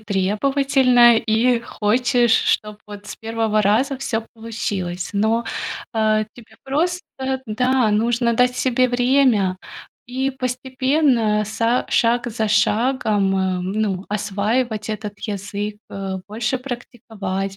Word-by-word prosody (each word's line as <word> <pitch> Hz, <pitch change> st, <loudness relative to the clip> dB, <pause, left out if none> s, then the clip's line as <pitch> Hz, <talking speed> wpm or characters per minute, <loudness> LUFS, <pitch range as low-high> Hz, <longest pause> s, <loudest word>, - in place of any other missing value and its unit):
требовательная 240 Hz, +4 st, +3 dB
и 225 Hz, +2 st, +2 dB
хочешь, 235 Hz, +1 st, +1 dB
чтоб 210 Hz, -1 st, +1 dB
вот 205 Hz, 0 st, -10 dB
с -, -, -8 dB
1 225 Hz, -1 st, 0 dB
раза 240 Hz, +8 st, +2 dB
всё 235 Hz, -4 st, -2 dB
получилось. 205 Hz, -6 st, -4 dB
Но, 220 Hz, +3 st, +1 dB, 0.5 s
э, 215 Hz, -1 st, +2 dB
тебе 220 Hz, -2 st, -16 dB
просто 325 Hz, +6 st, 0 dB, 0.5 s
да, 250 Hz, +1 st, +1 dB
нужно 235 Hz, +2 st, +1 dB
дать 250 Hz, +1 st, +3 dB
себе 255 Hz, 0 st, +2 dB
время 245 Hz, -6 st, +2 dB, 0.5 s
и 260 Hz, +2 st, -1 dB
постепенно 255 Hz, -3 st, 0 dB
са 230 Hz, +3 st, 0 dB
шаг 240 Hz, +1 st, +2 dB
за 220 Hz, 0 st, -1 dB
шагом, 210 Hz, -2 st, +2 dB
а, 190 Hz, -1 st, 0 dB
ну, 195 Hz, 0 st, -2 dB
осваивать 215 Hz, +2 st, -1 dB
этот 210 Hz, -1 st, -6 dB
язык, 205 Hz, 0 st, -4 dB
э, 195 Hz, -1 st, -5 dB
больше 220 Hz, +4 st, -2 dB
практиковать, 210 Hz, -6 st, -5 dB
225 Hz, 115 wpm, -21 LUFS, 210-250 Hz, 0.5 s, требовательная